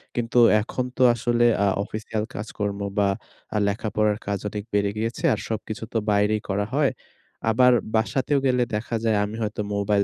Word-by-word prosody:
কিন্তু 120 0 -1 0.2
এখন 125 +3 -3
তো 130 - +4
আসলে 120 +1 +2 0.2
আ - - +3 0.2
অফিসিয়াল 110 0 -4
কাজকর্ম 105 -1 -4 0.2
বা 100 -1 +4 0.5
আ - - +3
লেখাপড়ার 105 0 0
কাজ 100 -1 -1
অনেক 105 0 -5
বেড়ে 100 -1 +2
গিয়েছে 115 +2 -3
আর 105 - -2
সবকিছু 110 +1 -4
তো - - +1
বাইরেই 105 +1 +2
করা 100 +1 0
হয়। 145 -1 +3 0.6
আবার 125 +3 +5 0.2
বাসাতেও 125 +6 +1
গেলে 125 -1 +3
দেখা 115 +2 -3
যায় 110 -2 +2
আমি 105 +2 -6
হয়তো 105 0 -3
মোবাইল 100 0 +2
110 Hz, 165 wpm, -24 LUFS, 105-120 Hz, 0.6 s, আবার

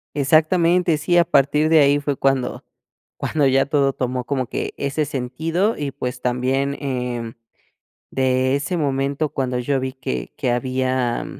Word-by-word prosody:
Exactamente, 165 +4 +3
sí, 175 +3 +1
a 170 - +5
partir 150 -1 +2
de 160 -1 +6
ahí 145 0 +4
fue 145 -1 -2
cuando 135 -2 0 0.5
cuando 150 -3 +1
ya 135 0 +3
todo 140 -2 +1
tomó 125 -1 -3
como 130 -3 -1
que - - -4
ese 140 +2 -1
sentido 160 - -1
y, 145 -2 -2
pues, 125 -1 -5
también, 130 +3 0
eh, 125 -4 -3 0.8
de 130 0 +1
ese 170 +5 -2
momento 140 0 -1
cuando 130 -2 -2
yo 135 +2 0
vi 130 0 -3
que 65 - -5
que 125 - 0
había, 130 -1 -1
135 Hz, 155 wpm, -21 LUFS, 130-150 Hz, 0.8 s, de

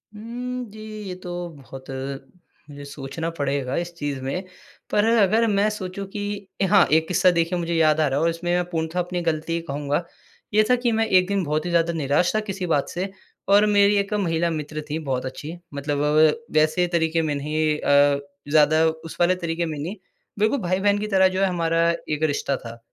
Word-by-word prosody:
उम, 245 +3 -5
जी, 215 - -11 0.3
ये 180 - -5
तो 175 -1 -5
बहुत 135 -1 -11 0.8
मुझे 145 -1 -9
सोचना 140 +3 -5
पड़ेगा 140 -2 -1
इस 175 0 -3
चीज 145 -4 -3
में। 140 +8 -3 0.5
पर 205 0 +3
अगर 225 0 +4
मैं 205 0 +2
सोचूँ 195 -2 -5
कि 205 0 -5
ए - - +4
हाँ, 195 -1 +5
एक 160 +1 +3
किस्सा 180 +1 +4
देखिए 170 +1 0
मुझे 170 0 -2
याद 155 -1 +3
आ 155 - +3
रहा 135 0 0
है - - 0
और 165 - +3
इसमें 170 +1 -3
मैं 180 0 +2
पूर्णतः 165 +1 -2
अपनी 175 0 -2
गलती 165 0 -1
कहूँगा। 145 +3 -1 0.5
ये 215 +1 +5
था 250 - +6
कि 245 -1 0
मैं 225 0 +2
एक 185 -3 +4
दिन 200 -1 0
बहुत 150 0 -1
ही - - -2
ज़्यादा 170 0 +2
निराश 160 +5 +1
था - - +3
किसी 190 -1 -3
बात 145 -4 +1
से, 185 +2 -3 0.4
और 200 +2 +6
मेरी 205 0 +4
एक 200 +1 -1
महिला 170 -4 +1
मित्र 155 -1 -4
थी 155 +2 -2
बहुत 130 -4 -2
अच्छी, 150 +6 -6 0.2
मतलब 145 +1 -2
वव 150 +1 +2 0.4
वैसे 155 +4 +2
तरीके 165 -1 +2
में 155 -2 -1
नहीं 150 +1 0
अ, 145 0 +4 0.3
ज़्यादा 155 +1 +5
उस 160 0 -3
वाले 175 +1 +4
तरीके 170 -1 -2
में 155 -2 -4
नहीं, 170 +8 -4 0.4
बिल्कुल 220 +6 +2
भाई-बहन 195 +2 +1
की 210 - -3
तरह 190 -2 +4
जो 185 +1 -2
है 195 - +4
हमारा 165 -2 +1 0.2
एक 150 0 -1
रिश्ता 145 -2 0
था। 115 -1 -10
170 Hz, 205 wpm, -23 LUFS, 150-195 Hz, 0.8 s, था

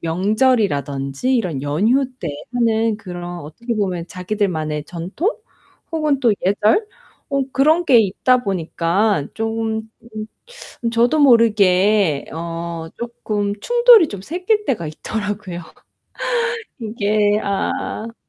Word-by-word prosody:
명절이라든지 185 - +1
이런 170 - -2
연휴 215 - +2
때 165 - -4 0.3
하는 225 -2 +2
그런 175 -4 -7
어떻게 230 +11 -5
보면 185 -5 -2
자기들만의 180 -6 -2
전통? 180 - -3 0.6
혹은 305 -4 +1
또 235 -4 +4
예절? 210 - +2 0.4
어 275 -1 +1
그런 315 +6 +3
게 255 -7 +6
있다 225 +5 +2
보니까 180 -1 0
쪼금 225 0 -2 1.0
음 230 - +1
저도 240 +6 +2
모르게 205 - +4
어 165 0 -5
쪼끔 215 -4 -3
충돌이 475 -7 +6
좀 200 -2 -7
생길 370 - -1
때가 175 - -1
있더라고요. 205 +1 -5 1.2
이게 210 -1 +1
아 215 +3 -3
210 Hz, 225 characters per minute, -20 LUFS, 175-235 Hz, 1.2 s, 게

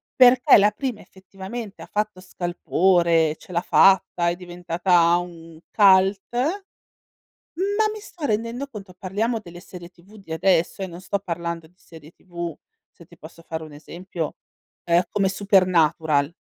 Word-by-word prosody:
perché 255 +2 +6
la 205 +1 +5
prima 235 +1 -5
effettivamente 195 +3 -10
ha - - -10
fatto 210 -2 -2
scalpore, 175 -3 +1
ce - - -15
l'ha 170 -1 0
fatta, 180 -2 +3
è 170 - -2
diventata 175 -1 +1
un 165 -2 -9
cult, 195 -1 +5 1.3
ma 405 +5 0
mi 430 - -8
sto 355 -6 -10
rendendo 230 +3 -2
conto 200 -7 -11
parliamo 210 +6 -2
delle 175 -4 -12
serie 175 -2 -12
TV 180 +4 -19
di 195 -6 -10
adesso 170 +2 +1
eh, 190 - -2
non 175 -1 -10
sto 200 +2 -2
parlando 170 -3 -5
di 165 - -26
serie 160 -3 -16
TV, 170 -3 -7 0.4
se - - -18
ti - - -20
posso 165 - -13
fare 160 0 -5
un 155 -1 -11
esempio, 170 +1 -7 0.5
ehm, 170 +1 +3
come 195 -2 +1
Supernatural 170 -6 +2
180 Hz, 150 wpm, -23 LUFS, 170-205 Hz, 1.3 s, perché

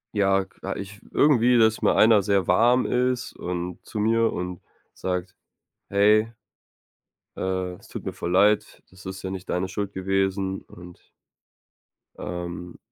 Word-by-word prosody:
Ja, 95 -1 +3
k - - -22 0.2
ich 100 +1 -8
w - - -24
äh, - - -18
irgendwie, 125 -4 +4
dass 110 -1 +3
mal - - +3
einer 110 -2 +6
sehr 100 -2 +1
warm 120 +7 +4
ist 125 0 0
und 90 0 -5
zu 105 - -5
mir 115 +1 +2
und 90 -1 -4 0.3
sagt: 90 0 -4 0.6
„Hey!" 105 +3 +4 1.1
„äh, 95 -1 -2
es - - -18
tut - - -8
mir - - -3
voll 85 - -4
leid. 105 +3 +2
Das 95 +1 -16
ist 95 0 -7
ja 95 - -3
nicht 95 -1 -7
deine 90 +1 0
Schuld 100 +1 -4
gewesen“ 95 0 -1
und 90 0 -14 1.2
Ähm. 90 0 -6
95 Hz, 155 wpm, -25 LUFS, 90-110 Hz, 1.2 s, einer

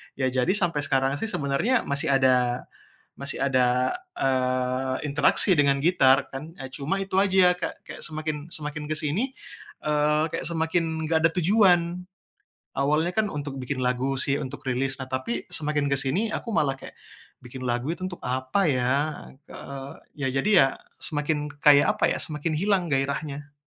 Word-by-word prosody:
Ya 130 -1 0
jadi 130 +7 +1
sampe 175 -7 0
sekarang 135 0 0
sih 225 - -2
sebenarnya 205 - 0
masih 140 +3 -2
ada, 125 -2 +2 0.5
masih 140 0 -5
ada, 125 -1 +2 0.2
eee, 130 0 0
interaksi 150 +6 +4
dengan 140 -4 +4
gitar, 140 -6 +4
kan, 155 +6 -8
e - - -8
cuma 145 +7 -2
itu 195 -1 0
aja 190 -2 +5
kek - - -5
kek - - -9
semakin 155 -1 -4
semakin 150 -2 -5
ke 155 - -1
sini, 175 - -1 0.5
eee, 150 0 +2
kek 165 - -3
semakin, 160 -1 -1
nggak 160 0 +3
ada - - +7
tujuan. 180 -1 +3 0.7
Awalnya 150 +5 +1
kan 220 -1 +2
untuk 145 -5 -5
bikin 130 0 -3
lagu 125 +2 0
sih, 140 +1 0
untuk 135 -1 -7
rilis, 135 0 -1
nah 130 -1 -8
tapi 130 -3 -2
semakin 150 -2 -1
ke 140 - +2
sini 180 +12 0
aku 230 - -4
malah 135 -6 +2
kayak, - - -11 0.5
bikin 130 +1 -7
lagu 120 +5 -1
itu 185 +2 -4
untuk 175 -1 -9
apa 130 +9 0
ya? 125 -1 +1 0.6
Eee, 140 0 -8 0.3
ya - - +2
jadi 175 - 0
ya, - - +4 0.4
semakin 150 0 -1
kayak 145 -1 +5
apa - - +4
ya, - - -2
semakin 155 +1 -3
hilang 185 +1 +1
gairahnya. 140 +1 -2
145 Hz, 160 wpm, -25 LUFS, 135-165 Hz, 0.7 s, ada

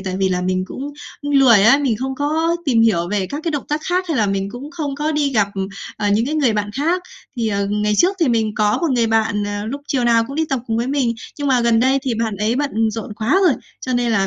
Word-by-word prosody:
tại 185 -1 -3
vì 190 0 +1
là 180 -1 0
mình 185 0 -1
cũng 280 +7 -6 0.3
cũng 290 - -3
lười 255 -7 +6
á, 240 +6 +6
mình 255 -7 0
không 265 +3 -3
có 320 +4 0
tìm 240 -6 +3
hiểu 175 -7 +2
về 200 -1 -1
các 290 +9 -5
cái 335 - 0
động 290 -3 -3
tác 300 +1 -1
khác 365 +1 +1
hay 320 - 0
là 215 - +2
mình 195 0 -2
cũng 260 +6 -8
không 305 -5 -4
có 300 +2 -1
đi 290 -2 0
gặp, 210 -5 +2
ừ, 195 0 -3 0.3
ờ, 210 -1 -1
những 215 +4 +2
cái 305 - -2
người 275 -7 +2
bạn 210 -1 -2
khác. 335 +6 0 0.3
Thì, 230 -2 0
ờ, 200 -1 -1
ngày 210 +1 0
trước 375 +3 +3
thì 320 - +3
mình 220 -2 +1
có 210 -1 +1
một 340 - 0
người 235 -2 +2
bạn, 220 -2 +1
ờ, 205 0 -4
lúc 275 +5 -4
chiều 255 -3 0
nào 230 -1 +4
cũng 275 - -7
đi 320 - +1
tập 270 -3 -1
cùng 225 - -1
với 235 +1 -1
mình, 265 -4 0 0.2
nhưng 285 - -2
mà 255 -2 +3
gần 235 -1 +3
đây 265 +2 +3
thì 255 -4 -1
bạn 220 -2 -2
ấy 210 +4 0
bận 225 -6 0
rộn 215 -1 -6
quá 230 - +1
rồi, 295 - +4 0.3
cho 255 - -3
nên 240 -1 +1
là 195 -3 +2
235 Hz, 285 wpm, -19 LUFS, 210-285 Hz, 0.3 s, lười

